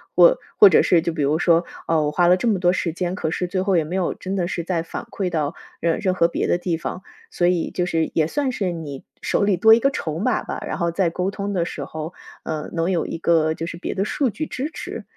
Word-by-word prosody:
或 - - +7 0.2
或 415 - +9
者 - - +5
是 175 -2 +4
就 170 0 -1
比 155 -3 -2
如 150 +3 +1
说： 170 -1 +3 0.2
“呃， 165 -1 +2
我 150 - 0
花 175 +3 +3
了 180 +1 +5
这 240 - -1
么 210 -5 +2
多 175 -1 +3
时 175 -2 -1
间， 180 +1 -2
可 160 -5 -2
是 180 +1 -2
最 185 +1 -1
后 190 -2 +2
也 165 - +2
没 160 +4 -5
有 185 -2 0
真 190 +1 -5
的 180 -3 0
是 175 -1 -3
再 170 -1 -1
反 165 - -6
馈 185 -3 -3
到， 155 -1 -1 0.3
呃， 170 -1 +1
任 185 -2 0
何 170 -2 +3
别 170 - -2
的 175 - +1
地 175 -2 -1
方。 180 - -5 0.3
“所 175 - +1
以 180 -2 0
就 180 -1 -1
是 160 -2 0
也 155 -1 +2
算 275 - -1
是 195 -7 -2
你 150 -5 -7 0.2
手 - - +1
里 200 -2 +2
多 220 +5 +7
一 225 - +6
个 275 - +3
筹 160 - -4
码 225 +4 0
吧。 - - -5
然 - - -3
后 170 -2 0
在 175 0 +1
沟 180 +3 -2
通 200 +1 -4
的 180 -4 0
时 - - -5
候， 160 +2 -6 0.3
呃， 155 -1 -4
能 165 +2 0
有 170 -3 0
一 - - -4
个 160 -1 +2
就 165 - -4
是 170 - -6
别 170 - -5
的 195 +1 0
数 270 +4 0
据 310 +8 -4
支 280 0 -4
持。 - - -7
175 Hz, 295 characters per minute, -22 LUFS, 165-190 Hz, 0.3 s, 或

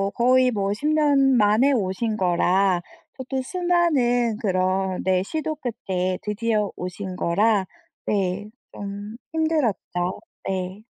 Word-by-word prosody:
거의 255 +1 +4
뭐 200 -2 0
10년 285 -1 +3
만에 215 +6 +4
오신 215 +1 -1
거라 180 0 +2 0.4
저도 260 0 -3
수많은 275 - +1
그런 185 -1 0
네 185 0 +2
시도 310 +6 -3
끝에 185 -8 -2
드디어 210 0 0
오신 185 +1 -5
거라 200 +3 +2 0.4
네 200 0 -1 0.2
좀 205 +2 -7 0.2
힘들었죠. 260 - -1 0.3
네. 190 +2 -4
210 Hz, 195 characters per minute, -23 LUFS, 190-255 Hz, 0.4 s, 거의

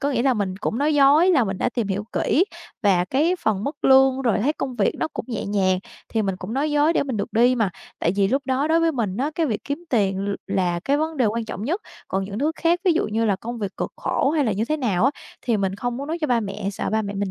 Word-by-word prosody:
có 285 +1 0
nghĩa 240 -3 0
là 265 -2 +3
mình 190 -3 -2
cũng 220 +3 -2
nói 300 +2 +2
dối 290 +6 +6
là 275 -9 +4
mình 195 -2 -3
đã - - +1
tìm 230 -5 -2
hiểu 200 +2 -2
kỹ 340 - +2 0.4
và 185 -3 +3
cái 310 - +1
phần 210 -2 +1
mức 285 - -5
lương 265 0 +5
rồi 235 -4 +2
thấy 275 +8 +1
công 255 -5 -5
việc 200 - +2
nó - - -1
cũng - - -5
nhẹ 225 -4 -3
nhàng, 190 -2 +1 0.3
thì 220 -1 0
mình 195 -2 -1
cũng 190 +4 -7
nói 295 +3 0
dối 295 +2 +3
để - - +2
mình 260 -5 -3
được 200 - -3
đi 245 +3 +4
mà, 220 -6 +1 0.3
tại 170 - +1
vì 195 -1 +3
lúc 270 +4 +1
đó 265 +3 +1
đối 330 +1 +3
với 330 -1 +2
mình 210 -7 -2
á 280 +5 -1
cái 330 -2 +1
việc 215 -5 -3
kiếm 290 +5 -4
tiền 195 -5 +1
l 200 - 0
là 180 -3 0
cái 280 +1 +2
vấn 315 +1 -2
đề 250 -4 +3
quan 225 +2 -1
trọng 215 -1 -6
nhất, 345 - -1 0.3
còn 190 0 -1
những 200 +2 -6
thứ 305 +4 +1
khác 340 +1 +2
ví 360 - +5
dụ 325 - +1
như 225 +2 0
là 200 -3 +2
công 235 +4 -6
việc 200 -2 -4
cực - - -3
khổ 275 - 0
hay 305 -2 +1
là 220 - +1
như 210 +4 -1
thế 310 +5 -1
nào 225 -7 +1
á, 270 - +5 0.3
thì 235 -3 +1
mình 195 -1 -1
không 245 +3 -3
muốn 280 +2 -5
nói 330 +2 -2
cho 305 - 0
ba 240 -3 +2
mẹ 200 -1 -4
sợ - - -3
ba 220 0 +1
mẹ 200 0 -5
mình 195 -1 -2
235 Hz, 300 wpm, -23 LUFS, 200-285 Hz, 0.4 s, dối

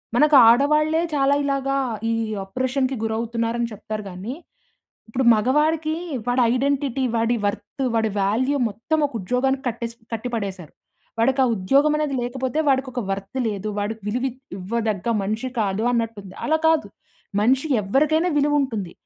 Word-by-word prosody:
మనకు 300 +3 +5
ఆడవాళ్లే 300 +6 +4
చాలా 280 -1 +3
ఇలాగా 275 -1 0 0.3
ఈ - - +1 0.3
అప్రోర్షన్‌కి 260 +6 -1
గురవుతున్నారని 230 +1 -1
చెప్తారు 215 0 -6
గాని, 190 +7 -6 0.8
ఇప్పుడు 245 +4 -1
మగవాడికి 300 +8 +1 0.3
వాడి 245 +1 +2
ఐడెంటిటీ 270 0 0
వాడి 230 +1 +1
వర్త్ 235 +7 -4
వాడి 220 -1 +1
వాల్యూ 250 +8 +1
మొత్తం 230 +10 -2
ఒక 280 - -15
ఉద్యోగానికి 260 +7 0
కట్టేసి 235 0 -4 0.2
కట్టిపడేసారు. 205 -7 -4 0.5
వాడికా 260 +4 +3
ఉద్యోగం 275 +10 +3
అనేది 300 -2 -1
లేకపోతే 260 +3 -3
వాడికొక 260 -2 0
వర్త్ 195 +5 -4
లేదు. 205 0 -4
వాడికి 215 +2 -3
విలువివ్వదగ్గ 230 -4 -3 0.2
మనిషి 220 +6 -2
కాదు 200 0 0
అన్నట్టుంది. 225 -5 -3
అలా 315 +1 +2
కాదు. 320 -1 +2 0.5
మనిషి 265 +7 +2
ఎవరికైనా 305 - +2
విలువ 295 +1 +2
ఉంటుంది. 210 -9 -4
245 Hz, 125 wpm, -22 LUFS, 215-275 Hz, 0.8 s, మనకు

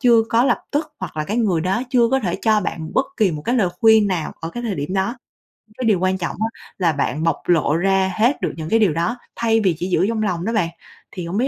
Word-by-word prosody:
chưa 235 -3 +5
có 230 +2 +3
lập - - +2
tức 305 +1 -2
hoặc 180 -4 -6
là 155 - -1
cái 210 - -3
người 200 -8 +1
đó 190 +7 0
chưa 240 -3 +4
có 265 - +2
thể 180 -6 -2
cho 215 -2 +3
bạn 160 -4 -4
bất 270 - +2
kỳ 210 -5 +3
một 150 -2 -5
cái 240 - 0
lời 210 -8 +2
khuyên 220 -2 +6
nào 180 -5 -2
ở 165 - -5
cái 240 +7 -6
thời 220 -5 -2
điểm 145 +4 -4
đó. 195 +6 0 0.5
Nhưng 215 - -24
cái 255 - -3
điều 200 -5 +3
quan 185 0 +1
trọng 170 -3 -3
á 220 - +1 0.3
là 175 -4 +2
bạn 150 +1 -2
bộc 165 - +1
lộ 155 -3 +3
ra 190 +1 +2
hết 240 +6 +2
được - - -1
những 160 -1 -5
cái 225 - +3
điều 200 -8 +3
đó 170 +10 -1 0.2
thay 225 -1 +2
vì 190 -6 +2
chỉ 180 - -3
giữ 185 +1 +2
trong 220 -1 -1
lòng 180 -4 -1
đó 225 - -1
bạn. 175 -7 +1 0.4
Thì 180 -3 -6
hổng 185 +4 -3
biết 255 - +2
195 Hz, 280 wpm, -20 LUFS, 170-230 Hz, 0.5 s, khuyên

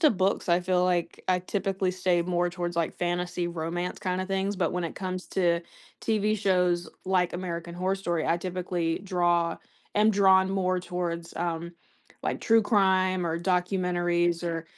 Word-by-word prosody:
to 310 -4 +6
books 190 -2 0
I 175 +1 +4
feel 180 0 +2
like 175 -2 -1
I 185 -1 +3
typically 190 0 -1
stay 180 -1 +1
more 175 0 0
towards 175 -1 -4
like 170 -2 0
fantasy 175 0 -2
romance 170 +2 -3
kinda 185 0 -2
things, 195 +1 -1
but 180 - 0
when 180 -1 -1
it 165 - -4
comes 185 -1 -4
to 175 -3 +2 0.4
TV 215 -1 +1
shows 180 -4 +1 0.2
like 180 -2 +2
American 170 -1 -4
Horror 185 +2 0
Story, 175 -4 -2
I 170 - +3
typically 175 -2 -2
draw 175 -3 +1 0.4
am 210 +1 +5
drawn 190 -2 +5
more 185 -1 +1
towards, 175 -1 -4
um, 170 0 -2 0.5
like, - - -2
true 225 -1 +4
crime 185 -4 +2
or 165 0 -1
documentaries 175 -1 +1
or 165 -1 -2
180 Hz, 160 wpm, -27 LUFS, 175-190 Hz, 0.5 s, to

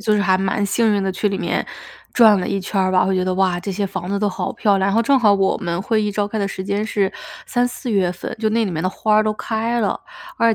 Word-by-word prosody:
就 210 +1 +1
是 205 - +2
还 185 -1 +3
蛮 195 +1 0
幸 215 +2 +2
运 200 - 0
地 195 - 0
去 200 +3 -1
里 195 - -2
面， - - -2 0.5
转 220 -4 +6
了 180 - -2
一 195 - -1
圈 195 +1 -2
儿 185 0 +1
吧。 185 - +4
我 190 - 0
觉 185 -1 +1
得， 185 - -1
哇， 185 -1 +1
这 195 +2 -5
些 200 +2 -2
房 190 -2 -5
子 200 - -1
都 205 +1 +1
好 190 - -3
漂 200 -2 +2
亮。 190 - +1
然 200 - 0
后 230 - +3
正 270 +3 +3
好 210 -4 +4
我 195 -1 +1
们 170 0 -3
会 220 +2 +1
议 210 -1 -1
召 205 0 0
开 220 - -3
的 200 - 0
时 190 -1 -5
间 205 +3 -2
是 200 -3 0 0.3
三、 245 -1 0
四 250 0 -5
月 190 -4 +1
份， 180 - -7
就 220 -1 +1
那 225 +1 +1
里 200 - -2
面 160 -2 -3
的 185 - 0
花 210 +3 +1
儿 215 - +4
都 215 - +1
开 230 +2 -2
了， 205 - -1 0.4
而 230 -1 +3
200 Hz, 325 characters per minute, -20 LUFS, 190-215 Hz, 0.5 s, 转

